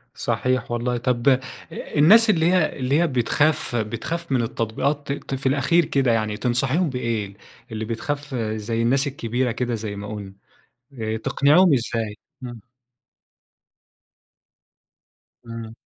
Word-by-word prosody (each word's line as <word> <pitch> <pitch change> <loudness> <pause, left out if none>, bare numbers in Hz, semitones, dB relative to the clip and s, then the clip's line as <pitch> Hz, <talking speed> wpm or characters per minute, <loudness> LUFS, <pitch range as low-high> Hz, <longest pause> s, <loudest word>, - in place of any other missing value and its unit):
صحيح 130 -2 -1
والله، 120 +1 -1
طيب 120 +2 +1
أ 130 -1 +4 0.3
الناس 210 +10 +4
اللي 165 -5 +3
هي 175 -6 +1
اللي 135 +4 +1
هي 175 - +3
بتخاف 135 +2 +1
بتخاف 120 +9 -3
من 130 - +2
التطبيقات 130 +6 -2
ت 140 - -5
ت - - +1
في 135 +1 -8
الأخير 145 +5 +2
كده 135 -4 +1
يعني، 110 -2 0
تنصحيهم 135 +7 +1
بإيه 115 -6 -3 0.4
اللي 110 0 -4
بتخاف 140 +5 -4
زي 110 0 -2
الناس 135 +4 +2
الكبيرة 125 -2 -2
كده 120 0 -2
زي 105 -2 -5
ما 100 +1 -7
قُلنا، 100 -2 -7 0.7
آآ 110 0 -2
تقنِعيهم 145 +8 +4
إزاي؟ 115 -3 -2 0.3
امم. 120 -4 -8 2.8
إمم. 115 -1 -8
125 Hz, 130 wpm, -23 LUFS, 115-140 Hz, 2.8 s, أ